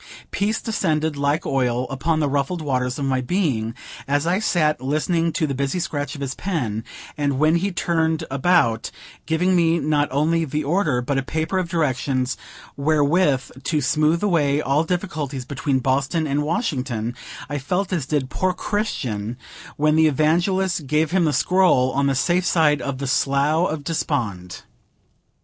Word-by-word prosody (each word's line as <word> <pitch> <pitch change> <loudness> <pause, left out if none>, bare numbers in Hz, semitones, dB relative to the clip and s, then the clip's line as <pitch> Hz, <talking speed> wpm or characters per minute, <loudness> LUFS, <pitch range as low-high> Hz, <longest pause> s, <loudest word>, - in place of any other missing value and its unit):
Peace 210 +2 0
descended, 160 -9 -1
like 145 +2 0
oil, 125 -2 0
upon 155 +4 0
the 150 - +1
ruffled 140 +5 -1
waters 125 -3 -1
of 140 - -2
my 130 -1 +1
being, 125 - -1 0.3
as 145 +2 +1
I 180 +3 +1
sat 155 - +1
listening 165 +5 0
to 160 0 0
the 140 - -2
busy 140 +6 -1
scratch 145 -4 -3
of 140 - -8
his 135 -1 -2
pen; 125 - -3 0.4
and, 140 -2 0
when 155 +4 +3
he 195 +4 -1
turned 160 -2 0
about, 135 -6 +2 0.4
giving 180 +3 +2
me 170 -1 +3
not 150 -1 +1
only 160 +4 +1
the 150 0 -2
order, 145 -5 +1
but 135 +1 0
a - - 0
paper 160 +7 -2
of 180 -2 -3
directions 130 -6 0 0.4
wherewith 145 -1 +2
to 155 - +1
smooth 155 +5 +1
away 150 -8 +2
all 145 +1 +1
difficulties 155 -7 -3
between 140 +1 -1
Boston 135 +5 0
and 145 0 0
Washington, 130 - -2 0.3
I 145 0 -3
felt 180 +8 -2
as 155 -8 -1
did 140 -3 -1
poor 185 -1 0
Christian 125 - -3 0.4
when 150 +1 +3
the 160 0 +5
Evangelist 170 +3 +1
gave 150 +3 +1
him 185 -2 +3
the 155 - +2
scroll, 180 -9 +3
on 140 +1 +1
the 135 - +1
safe 175 +6 +1
side 150 -3 +3
of 140 -2 -3
the 140 - -4
Slough 140 +6 +2
of 155 -2 -4
Despond. 115 - -3
150 Hz, 165 wpm, -22 LUFS, 135-170 Hz, 0.4 s, the